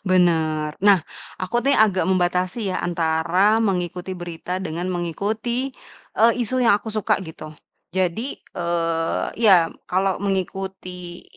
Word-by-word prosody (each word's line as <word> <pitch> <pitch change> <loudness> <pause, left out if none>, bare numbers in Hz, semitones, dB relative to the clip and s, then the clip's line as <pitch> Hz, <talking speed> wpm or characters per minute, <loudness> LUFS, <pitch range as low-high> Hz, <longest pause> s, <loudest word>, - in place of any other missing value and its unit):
Bener. 160 -5 +2
Nah, 200 -2 +6 0.4
aku 185 +5 -2
nih 280 +1 +3
agak 205 -4 +4
membatasi 185 +3 0
ya, - - -1
antara 175 +5 +2
mengikuti 180 -2 -2
berita 175 +1 -5
dengan 175 -1 -4
mengikuti 215 +9 -2 0.5
eee, 230 +2 +6
isu 255 +3 -1
yang 235 - +6
aku 210 +2 -3
suka, 215 -1 +1
gitu. 160 -2 -9 0.4
Jadi, 190 +8 -1 0.2
eee, 165 -2 0 0.2
ya 180 -6 +6 0.2
kalau 190 +1 +1
mengikuti 190 -2 -4
185 Hz, 120 wpm, -22 LUFS, 170-200 Hz, 0.5 s, Nah